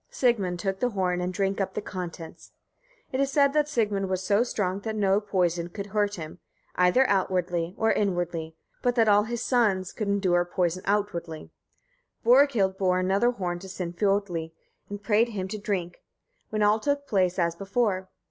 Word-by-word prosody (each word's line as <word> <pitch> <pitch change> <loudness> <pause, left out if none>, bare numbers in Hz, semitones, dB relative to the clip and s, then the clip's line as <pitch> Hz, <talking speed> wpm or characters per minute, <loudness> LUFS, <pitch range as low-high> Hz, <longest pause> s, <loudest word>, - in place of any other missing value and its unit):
Sigmund 205 -8 +1
took 190 +1 -3
the 250 - +1
horn 180 -4 -1
and 180 +1 -2
drank 195 +1 -1
up 190 -1 -3
the - - 0
contents. 175 -4 -8 0.6
It 260 - -2
is 275 0 +1
said 280 -1 +3
that 300 -1 +2
Sigmund 205 -7 0
was 185 0 -1
so 200 +3 +3
strong 200 -6 -1
that 220 +1 -4
no 200 -1 +2
poison 175 -4 0
could 200 +3 -6
hurt 205 0 0
him, 160 -1 -8 0.3
either 180 +9 +4
outwardly 180 -2 0
or 225 0 +2
inwardly; 175 -5 -1 0.3
but 245 -1 +1
that 225 -2 +3
all 205 0 +5
his 235 +1 -4
sons 205 -7 +1
could 215 - -3
endure 190 -3 +2
poison 175 0 -1
outwardly. 175 -6 -2 0.7
Borghild 235 -7 +4
bore 185 -2 +2
another 195 +6 +2
horn 180 -7 -3
to 190 - -10
Sinfiotli, 180 -2 -1 0.4
and 205 0 -7
prayed 225 +2 +3
him 195 -4 -4
to 215 +1 -5
drink, 185 -4 -3 0.5
when 215 -1 0
all 210 +1 +4
took 285 +3 -1
place 185 -6 +1
as 170 -2 +1
before. 195 -1 -1
195 Hz, 175 wpm, -26 LUFS, 180-215 Hz, 0.7 s, all